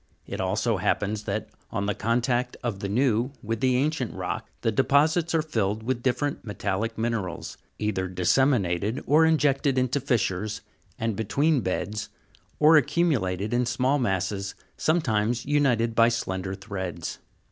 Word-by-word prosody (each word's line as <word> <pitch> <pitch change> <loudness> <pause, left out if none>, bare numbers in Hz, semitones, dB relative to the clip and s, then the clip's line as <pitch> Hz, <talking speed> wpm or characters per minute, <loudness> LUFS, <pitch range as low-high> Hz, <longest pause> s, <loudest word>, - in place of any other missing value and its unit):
It - - -4
also - - 0
happens 105 +1 -1
that, 105 0 -3 0.2
on 100 -3 -2
the 105 - 0
contact 120 +3 0
of 115 -5 -2
the 100 - -3
new 120 +2 +1
with 115 +1 -2
the 130 +1 +2
ancient 140 -3 -1
rock, - - -4
the 115 - +1
deposits 155 - +3
are 160 - +2
filled 110 -7 -1
with 120 0 -1
different 140 +3 -1
metallic 105 +1 -2
minerals, 110 -6 -3 0.2
either 95 -3 -1
dissemi 125 +9 +3
nated 95 +7 -2
or 160 +3 +5
injected 140 -3 +2
into 130 +2 +1
fissures, 110 -6 -1 0.4
and 115 -2 -1
between 140 +7 +1
beds, 105 +2 -3 0.5
or 155 +1 +7
accumulated 130 - +1
in 120 0 +1
small 130 +4 +1
masses, 95 -2 -1 0.2
sometimes 120 -8 +1
united 125 -6 +2
by 115 +1 +5
slender 95 -4 -3
threads. 95 -4 -5
115 Hz, 145 wpm, -26 LUFS, 100-135 Hz, 0.5 s, or